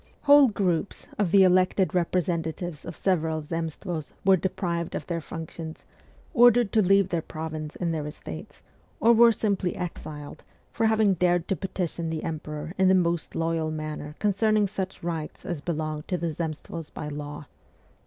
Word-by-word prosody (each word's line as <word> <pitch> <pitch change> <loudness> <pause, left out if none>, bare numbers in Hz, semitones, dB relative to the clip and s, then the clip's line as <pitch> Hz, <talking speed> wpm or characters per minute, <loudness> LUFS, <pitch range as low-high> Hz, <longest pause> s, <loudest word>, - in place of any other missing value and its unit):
Whole 285 -1 +8
groups 195 -5 -1
of 200 -4 +2
the 195 +2 +6
elected 185 +1 +3
representatives 170 -2 -1
of 165 - -6
several 160 -4 0
Zemstvos 165 0 -4
were 195 0 +7
deprived 170 -2 -2
of - - -4
their 170 -2 -3
functions, 160 0 -7 0.5
ordered 240 - +6
to 220 - +4
leave 195 0 +4
their 170 -3 0
province 155 -1 -6
and 170 -2 -1
their 150 -2 -3
estates, 80 - -9 0.4
or 230 +2 +6
were 235 0 +7
simply 200 -5 0
exiled, 155 -4 -6 0.3
for 225 -1 +2
having 220 -2 +4
dared 175 -1 +1
to 195 - +2
petition 170 -1 -3
the 160 -1 -3
emperor 155 0 -5
in 190 - +5
the 190 - +6
most 170 -2 0
loyal 165 -1 0
manner 155 -1 -5
concerning 210 +1 +2
such 190 -2 -4
rights 165 -3 -4
as 170 -5 -3
belonged 155 -2 -3
to 180 - 0
the 170 -1 -2
Zemstvos 160 0 -5
by 155 - -6
law. 145 0 -6
170 Hz, 160 wpm, -26 LUFS, 155-190 Hz, 0.5 s, Whole